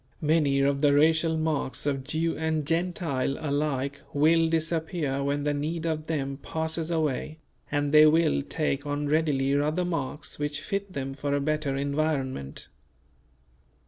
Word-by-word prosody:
Many 150 -3 +2
of 140 0 +1
the 145 -1 +4
racial 160 +2 +3
marks 155 -4 -2
of 135 -2 -1
Jew 160 +4 -1
and 160 -1 -1
Gentile 165 -5 -1
alike 140 -2 -1
will 165 +3 +4
disappear 160 -3 -1
when 145 +1 -1
the 150 0 +1
need 155 +3 -3
of 155 -1 -2
them 140 -4 -2
passes 160 0 -2
away; 155 -2 -1 0.3
and 145 0 0
they 155 0 +8
will 160 -1 +3
take 140 -1 -2
on 145 0 -2
readily 145 -3 +1
other 155 +5 0
marks 145 -4 -4
which 145 0 -2
fit 200 +2 -3
them 135 -2 -4
for 140 +1 -2
a - - +1
better 150 -1 -1
environment. 140 - -2
150 Hz, 145 wpm, -27 LUFS, 140-160 Hz, 0.3 s, they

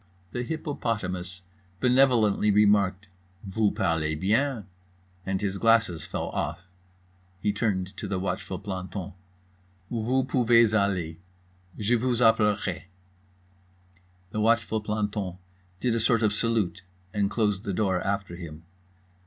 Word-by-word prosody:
The 125 - -3
hippopotamus 105 - -3 0.4
benevolently 125 -5 +4
remarked 100 -2 +3 0.4
"Voo 105 +2 +1
parlez 80 -4 0
bien," 110 +3 +1 0.6
and 95 0 0
his 100 -1 -2
glasses 115 -9 +3
fell - - -3
off. 95 - -3 0.8
He 105 +2 0
turned 100 -3 -1
to 105 - -4
the 100 -1 -1
watchful 95 +1 -3
planton: 95 -1 -5 0.8
"Voo 120 +3 +1
poovez 115 -3 +4
aller. 95 -6 0 0.6
Je 110 +3 +2
vooz 125 0 0
appelerai." 105 -6 +2 1.5
The 110 - -1
watchful 115 0 +2
planton 105 -3 -2 0.4
did 120 +4 +1
a 115 - +1
sort 115 0 +2
of 105 -1 +3
salute 105 -5 0 0.3
and 100 -1 +1
closed 105 -3 0
the 100 - -2
door 95 -2 +1
after 100 -3 -2
him. 85 -2 -9
105 Hz, 120 wpm, -27 LUFS, 95-115 Hz, 1.5 s, benevolently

